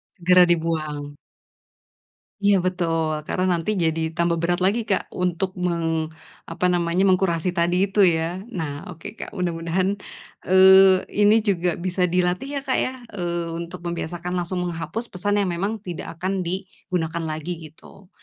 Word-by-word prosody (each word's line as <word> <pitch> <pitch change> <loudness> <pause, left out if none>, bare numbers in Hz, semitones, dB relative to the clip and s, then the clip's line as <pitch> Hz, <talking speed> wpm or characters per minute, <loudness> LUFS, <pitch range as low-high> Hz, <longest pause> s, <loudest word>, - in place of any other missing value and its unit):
Segera 180 +1 +5
dibuang. 155 -4 -1 1.2
Iya 205 0 +4
betul, 165 -4 0
karena 185 - 0
nanti 165 +5 -2
jadi 160 0 0 0.2
tambah 170 0 +1
berat 175 +1 +1
lagi 205 +5 +2
Kak, 195 -3 -1
untuk 180 +1 -1 0.2
meng 165 -2 -1 0.4
apa 170 +2 -1
namanya, 175 +1 +1
mengkurasi 185 -2 +2
tadi 170 +1 +2
itu 205 - +1
ya. 170 +1 0
Nah 155 -9 -5
oke 165 -2 -10
Kak, - - -6
mudah-mudahan, 175 +1 -1 0.6
eee, 190 0 +7 0.2
ini 210 +2 +6
juga 180 -4 +1
bisa 180 +1 -2
dilatih 180 +7 0
ya - - -3
Kak 260 - 0
ya, 255 - -1 0.2
eee, 175 -3 -2
untuk 170 +1 -6
membiasakan 170 +1 -4
langsung 180 +1 -2
menghapus 175 +7 -4
pesan 205 +3 0
yang 190 - -1
memang 200 +6 -2
tidak 175 -5 -6
akan 190 +2 -1
digunakan 175 -2 -3
lagi 155 +3 -4 0.2
gitu. 180 +4 -18
175 Hz, 145 wpm, -23 LUFS, 165-185 Hz, 1.2 s, eee